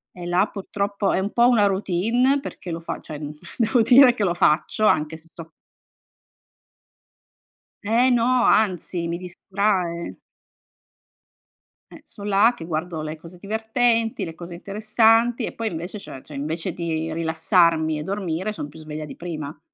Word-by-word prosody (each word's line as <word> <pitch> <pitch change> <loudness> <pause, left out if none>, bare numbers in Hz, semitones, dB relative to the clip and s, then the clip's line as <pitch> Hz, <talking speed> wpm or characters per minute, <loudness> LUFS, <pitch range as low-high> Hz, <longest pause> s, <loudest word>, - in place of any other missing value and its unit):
E 175 -1 -8
là 175 +2 +3
purtroppo 200 0 -2
è 190 - +1
un 200 - -2
po' 240 0 +4
una 225 -5 +4
routine 215 +8 +1
perché 180 -9 -7
lo 165 - -4
fa 165 - -5
cioè, 150 - -9
mhmm, 145 -1 -5 0.3
devo 235 +1 +3
dire 250 +3 +7
che 225 -4 -2
lo 175 -3 +1
faccio 175 +6 +2
anche 155 -4 +2
se 160 +1 -14
so 165 -1 -11 2.3
Eh 235 +5 +3
no, 245 0 +3
anzi 180 -4 +1
mi 170 - -2
distrae. 180 -1 -2 1.8
Eh, - - -13
son 205 -1 -8
là 205 +4 +5
che 165 - -8
guardo 160 0 -3
le 155 +1 -5
cose 165 +3 -13
divertenti, 225 +2 0
le 165 -2 -8
cose 170 0 -9
interessanti 220 +5 +2
e - - -2
poi 230 - -4
invece 175 +1 -4
cioè 135 -9 -10
cioè 150 - -11
invece 160 +5 -3
di 160 -1 -3
rilassarmi 160 -1 +2
e 150 - -5
dormire 190 +1 -3
son 150 -8 -6
più 145 - -14
sveglia 155 0 -7
di 150 - -9
prima. 155 -3 -6
185 Hz, 160 wpm, -23 LUFS, 165-220 Hz, 2.3 s, dire